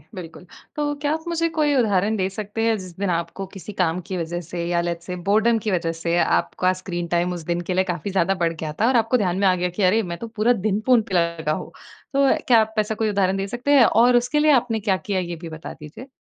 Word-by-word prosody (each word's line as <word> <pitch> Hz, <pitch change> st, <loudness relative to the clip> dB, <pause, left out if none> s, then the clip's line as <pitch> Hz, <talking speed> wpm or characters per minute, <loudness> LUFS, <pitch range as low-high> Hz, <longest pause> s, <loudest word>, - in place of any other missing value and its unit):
बिल्कुल। 175 Hz, 0 st, -9 dB, 0.3 s
तो 295 Hz, -1 st, -1 dB
क्या 290 Hz, -, +1 dB
आप 320 Hz, 0 st, -4 dB
मुझे 335 Hz, 0 st, 0 dB
कोई 295 Hz, -1 st, +3 dB
उदाहरण 215 Hz, -4 st, +2 dB
दे 190 Hz, -1 st, 0 dB
सकते 210 Hz, +2 st, -5 dB
हैं 225 Hz, -1 st, +2 dB
जिस 185 Hz, -3 st, -10 dB
दिन 200 Hz, -2 st, -1 dB
आपको 170 Hz, +3 st, -3 dB
किसी 195 Hz, +2 st, -8 dB
काम 170 Hz, 0 st, +1 dB
की 185 Hz, -, -2 dB
वजह 175 Hz, +1 st, -3 dB
से 170 Hz, -1 st, -4 dB
या 175 Hz, 0 st, +1 dB
लेट्स 170 Hz, 0 st, -4 dB
से 180 Hz, -, -4 dB
बोर्डम 225 Hz, +3 st, +3 dB
की 210 Hz, -, +1 dB
वजह 170 Hz, -2 st, 0 dB
से 170 Hz, +1 st, 0 dB
आपका 85 Hz, -, +1 dB
स्क्रीन 175 Hz, -2 st, -4 dB
टाइम 175 Hz, +1 st, +1 dB
उस 175 Hz, -, -6 dB
दिन 170 Hz, 0 st, 0 dB
के 185 Hz, -, +1 dB
लिए 185 Hz, +1 st, +2 dB
काफ़ी 180 Hz, +1 st, -4 dB
ज़्यादा 190 Hz, 0 st, +2 dB
बढ़ 165 Hz, 0 st, +1 dB
गया 155 Hz, -1 st, -5 dB
था 230 Hz, -, +4 dB
और 260 Hz, -, +2 dB
आपको 225 Hz, +2 st, +2 dB
ध्यान 185 Hz, -5 st, 0 dB
में 195 Hz, -, +3 dB
आ 185 Hz, -, +4 dB
गया 180 Hz, 0 st, -1 dB
कि 200 Hz, -, +2 dB
अरे! 205 Hz, +5 st, +4 dB
मैं 170 Hz, -2 st, -5 dB
तो 230 Hz, -, -7 dB
पूरा 225 Hz, +2 st, +1 dB
दिन 205 Hz, 0 st, +1 dB
फ़ोन 250 Hz, -3 st, +5 dB
पे 190 Hz, -, -2 dB
लगा 170 Hz, -3 st, 0 dB
हूँ। 155 Hz, -, -4 dB, 0.4 s
तो 275 Hz, 0 st, +3 dB, 0.2 s
क्या 235 Hz, -3 st, +6 dB
आप 220 Hz, 0 st, -3 dB
ऐसा 215 Hz, +1 st, 0 dB
कोई 220 Hz, 0 st, 0 dB
उदाहरण 195 Hz, -1 st, +1 dB
दे 195 Hz, +1 st, -2 dB
सकते 245 Hz, +6 st, -2 dB
हैं 255 Hz, -5 st, +7 dB
और 240 Hz, +3 st, +4 dB
उसके 245 Hz, +5 st, +1 dB
लिए 305 Hz, 0 st, +4 dB
आपने 245 Hz, -4 st, +2 dB
क्या 195 Hz, -3 st, +1 dB
किया 200 Hz, -3 st, 0 dB
ये 175 Hz, -1 st, -4 dB
भी 165 Hz, -, -7 dB
बता 160 Hz, 0 st, -8 dB
दीजिए? 160 Hz, -, -12 dB
195 Hz, 265 wpm, -22 LUFS, 175-225 Hz, 0.4 s, हैं